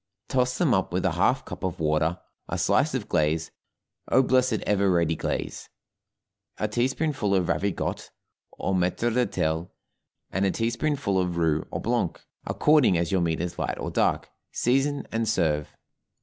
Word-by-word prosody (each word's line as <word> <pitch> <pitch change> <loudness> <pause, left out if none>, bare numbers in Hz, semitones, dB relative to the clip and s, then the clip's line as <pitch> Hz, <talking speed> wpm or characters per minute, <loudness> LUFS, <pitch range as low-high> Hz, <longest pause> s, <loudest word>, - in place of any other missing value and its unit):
Toss 125 -1 +1
them 155 -8 +3
up 95 -3 +1
with 90 +2 -1
a 95 - +3
half 100 +10 +1
cup - - -8
of 95 -3 -2
water, 80 +2 +1 0.3
a - - -2
slice - - +2
of - - -3
glaze 80 +1 0 0.6
(oh, 135 - +4
blessed 130 -4 +2
ever 100 -1 +2
ready 85 -3 +2
glaze!) - - -4 0.9
a 105 - 0
teaspoonful 125 -1 0
of 90 -2 +1
ravigotte, 95 +3 -2 0.4
or 95 - -2
maître 95 +6 +1
d'hôtel, 90 -9 0 0.6
and 95 - 0
a 100 - +3
teaspoonful 120 0 0
of 90 -2 -1
roux 80 -2 +1
or - - -4
blanc, - - -1 0.3
according 150 - +4
as 85 0 -1
your 95 -2 +2
meat 80 -2 0
is 90 0 -4
light - - -2
or - - -4
dark, - - 0 0.2
season, 135 +4 +1
and 115 0 0
serve. 75 -4 0
95 Hz, 160 wpm, -26 LUFS, 85-125 Hz, 0.9 s, oh